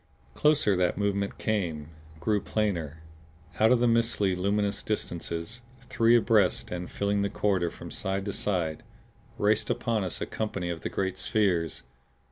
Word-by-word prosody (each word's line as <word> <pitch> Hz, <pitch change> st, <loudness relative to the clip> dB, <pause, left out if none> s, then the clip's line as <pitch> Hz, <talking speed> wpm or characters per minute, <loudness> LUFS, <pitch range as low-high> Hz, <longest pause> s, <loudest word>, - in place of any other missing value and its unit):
Closer 150 Hz, -9 st, +3 dB
that 90 Hz, -1 st, +1 dB
movement 100 Hz, 0 st, -1 dB
came, 85 Hz, -9 st, -2 dB, 0.3 s
grew 105 Hz, +4 st, +1 dB
plainer. 85 Hz, -9 st, -2 dB, 0.6 s
Out 110 Hz, +2 st, +5 dB
of 125 Hz, -, +5 dB
the 120 Hz, -, +3 dB
mistily 115 Hz, -5 st, +2 dB
luminous 100 Hz, +2 st, 0 dB
distances, 85 Hz, +1 st, -4 dB, 0.3 s
three 115 Hz, -1 st, +4 dB
abreast 110 Hz, -5 st, +2 dB
and 90 Hz, 0 st, -4 dB
filling 100 Hz, 0 st, 0 dB
the 100 Hz, -, 0 dB
corridor 95 Hz, -5 st, +1 dB
from -, -, -10 dB
side 95 Hz, 0 st, -2 dB
to 100 Hz, -, -2 dB
side, 85 Hz, -6 st, -1 dB, 0.6 s
raced 105 Hz, +1 st, +2 dB
upon 115 Hz, -3 st, 0 dB
us 90 Hz, -, -4 dB
a -, -, -2 dB
company 100 Hz, -5 st, -3 dB
of 85 Hz, -2 st, -5 dB
the -, -, -3 dB
great 95 Hz, -1 st, -2 dB
spheres! 90 Hz, -7 st, 0 dB
100 Hz, 150 wpm, -28 LUFS, 90-110 Hz, 0.6 s, Out